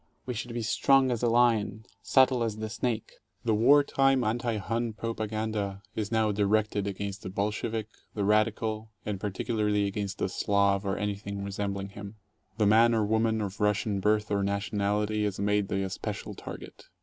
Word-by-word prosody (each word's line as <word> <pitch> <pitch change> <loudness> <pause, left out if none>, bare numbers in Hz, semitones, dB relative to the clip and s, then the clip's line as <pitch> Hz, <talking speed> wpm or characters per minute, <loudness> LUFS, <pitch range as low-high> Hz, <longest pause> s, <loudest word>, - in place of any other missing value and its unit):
We 125 - -3
should 120 +1 -5
be 120 - -2
strong 135 +3 +3
as 120 - -1
a 120 - +2
lion, 115 -3 +2 0.2
subtle 130 -2 +4
as 110 -2 -2
the 110 0 -4
snake. 115 0 -2
IV - - -24 0.3
The 115 - +3
war 140 +7 +6
time 135 -2 +2
anti 115 +1 -1
Hun 115 +3 -2
propaganda 110 -3 -3
is 105 -1 -3
now 110 -2 +2
directed 105 0 +1
against 100 0 -4
the - - -6
"Bolshevik," 105 +3 -2 0.3
"the 105 - -1
radical," 110 +1 +1 0.2
and 105 -2 -3
particularly 105 +1 0
against 100 0 -3
the - - 0
Slav 100 +1 +1
or 95 - 0
12 - - -3
anything 100 -1 -4
resembling 100 0 -3
him. 100 +1 -9 0.4
The 110 - +3
man 115 +3 +5
or 110 -2 +2
woman 110 +1 +1
of 100 -1 -5
Russian 105 -1 +1
birth 105 +1 +1
or 100 -1 +1
nationality 105 +1 0
is 105 -2 -2
made 105 0 +1
the 95 0 -1
especial 95 - -5
target. - - -10
105 Hz, 175 wpm, -28 LUFS, 100-115 Hz, 0.4 s, war